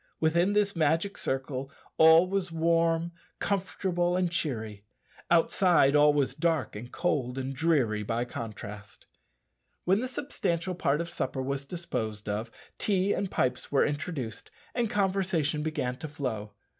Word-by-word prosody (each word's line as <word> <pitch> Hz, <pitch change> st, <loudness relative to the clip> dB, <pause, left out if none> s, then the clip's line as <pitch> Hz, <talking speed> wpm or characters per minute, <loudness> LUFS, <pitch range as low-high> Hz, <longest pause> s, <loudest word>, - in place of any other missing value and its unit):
Within 170 Hz, +5 st, +2 dB
this 205 Hz, -1 st, +2 dB
magic 165 Hz, +5 st, +1 dB
circle 135 Hz, 0 st, -3 dB, 0.3 s
all 160 Hz, +2 st, +8 dB
was 190 Hz, -2 st, -1 dB
warm, 165 Hz, 0 st, +2 dB, 0.3 s
comfortable, 180 Hz, -2 st, 0 dB
and 180 Hz, -2 st, +1 dB
cheery; 110 Hz, -11 st, -3 dB, 0.5 s
outside 170 Hz, -3 st, +4 dB
all 150 Hz, 0 st, +6 dB
was 140 Hz, -3 st, +1 dB
dark, 160 Hz, -3 st, 0 dB
and 120 Hz, +4 st, -8 dB
cold, 135 Hz, -8 st, -1 dB
and 135 Hz, 0 st, -3 dB
dreary 130 Hz, -10 st, +2 dB
by 115 Hz, +3 st, -1 dB
contrast. 105 Hz, -3 st, -8 dB, 0.8 s
When 190 Hz, +3 st, +3 dB
the 255 Hz, -, -2 dB
substantial 185 Hz, -, -2 dB
part 155 Hz, -3 st, +1 dB
of 170 Hz, -, -5 dB
supper 130 Hz, -4 st, -2 dB
was 140 Hz, +1 st, -3 dB
disposed 115 Hz, -, -4 dB
of, 105 Hz, +3 st, -2 dB, 0.3 s
tea 200 Hz, -1 st, +2 dB
and 195 Hz, -, -2 dB
pipes 130 Hz, -5 st, -1 dB
were 140 Hz, -, +4 dB
introduced, 145 Hz, -, -4 dB, 0.2 s
and 240 Hz, -3 st, 0 dB
conversation 185 Hz, -7 st, 0 dB
began 150 Hz, -5 st, -2 dB
to 160 Hz, -, -6 dB
flow. 115 Hz, -8 st, -4 dB
155 Hz, 140 wpm, -29 LUFS, 130-175 Hz, 0.8 s, all